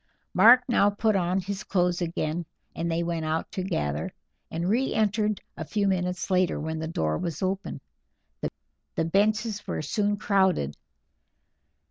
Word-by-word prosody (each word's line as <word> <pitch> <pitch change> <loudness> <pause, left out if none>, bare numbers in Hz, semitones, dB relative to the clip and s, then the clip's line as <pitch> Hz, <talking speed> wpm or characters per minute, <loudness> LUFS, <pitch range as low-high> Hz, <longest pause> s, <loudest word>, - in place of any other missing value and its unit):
Mark 235 +7 +8
now 220 -5 +4
put 210 +1 +1
on 180 0 +1
his 195 +2 -4
clothes 180 -2 +1
again, 165 0 -1 0.3
and 170 0 -2
they 165 +1 0
went 170 -1 -2
out 155 +1 -2
together, 75 - -2 0.4
and 170 +2 -2
re 245 +7 +1
entered 210 -1 +1 0.2
a - - -5
few 200 +5 0
minutes 180 -1 -1
later, 185 -1 +2
when 160 +1 -3
the 160 - -3
door 80 - -1
was 170 0 -3
open. 190 +1 -2 1.2
The 165 - +1
benches 210 +4 +1
were - - -2
soon 205 +7 0
crowded. 190 - +2
185 Hz, 145 wpm, -27 LUFS, 165-205 Hz, 1.2 s, Mark